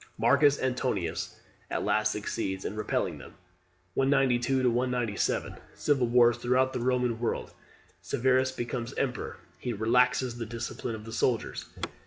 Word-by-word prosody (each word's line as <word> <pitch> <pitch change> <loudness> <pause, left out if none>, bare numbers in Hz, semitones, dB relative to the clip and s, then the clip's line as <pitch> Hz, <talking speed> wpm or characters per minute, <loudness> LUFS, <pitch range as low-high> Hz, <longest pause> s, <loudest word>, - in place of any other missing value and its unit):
Marcus 140 0 +4
Antoninus 125 -9 -1 0.3
at - - -2
last 110 0 +2
succeeds 100 -2 -3
in 105 - -3
repelling 105 -1 -1
them. - - -12 0.6
192 135 -1 +2
197. 120 -3 0 0.2
Civil 135 -5 +2
Wars 120 0 +5
throughout 130 +2 +2
the - - -2
Roman 125 -1 +1
world. 120 - -2 0.5
Severus 130 +1 +2
becomes 120 0 -4
emperor. 125 -4 -2 0.2
He 120 - -3
relaxes 120 +2 +2
the 115 - -4
discipline 115 0 -4
of 110 0 -9
the 115 - -8
soldiers. 115 +1 0
120 Hz, 130 wpm, -29 LUFS, 115-130 Hz, 0.6 s, Wars